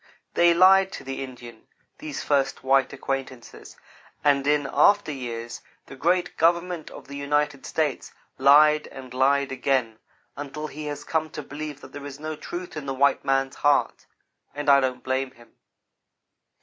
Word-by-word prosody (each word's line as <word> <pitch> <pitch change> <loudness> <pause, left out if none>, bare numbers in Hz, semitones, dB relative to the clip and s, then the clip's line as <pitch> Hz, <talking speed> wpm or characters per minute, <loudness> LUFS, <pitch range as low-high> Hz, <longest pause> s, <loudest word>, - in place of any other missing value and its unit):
They 170 0 +4
lied 190 +2 +6
to - - -7
the 135 0 -5
Indian 120 -3 -11 0.3
these 305 0 -6
first 135 -2 0
white 135 0 +3
acquaintances, 135 -2 -6 0.5
and 140 -1 +3
in 145 -1 +2
after 205 -5 +4
years, 120 -4 -6 0.2
the - - -11
great 175 +6 0
Government 170 0 +1
of - - -12
the 140 - -9
United 145 0 -1
States 150 -4 -2 0.3
lied 150 +3 +6
and 130 -2 -11
lied 135 +2 +2
again, 130 -4 -1 0.4
until 145 +2 -6
he 155 0 -7
has 145 -1 -5
come 160 -1 -1
to 150 - -7
believe 145 0 -7
that 130 - -13
there 145 0 -7
is 140 0 -10
no 155 +1 -5
truth 175 +3 -7
in 150 -2 -6
the 135 - -2
white 140 +2 +2
man's 135 0 0
heart. 145 0 +1 0.5
And 145 0 -2
I 140 - +7
don't 130 -1 -2
blame 130 0 -1
him. 120 -2 -20
140 Hz, 160 wpm, -25 LUFS, 135-155 Hz, 0.5 s, I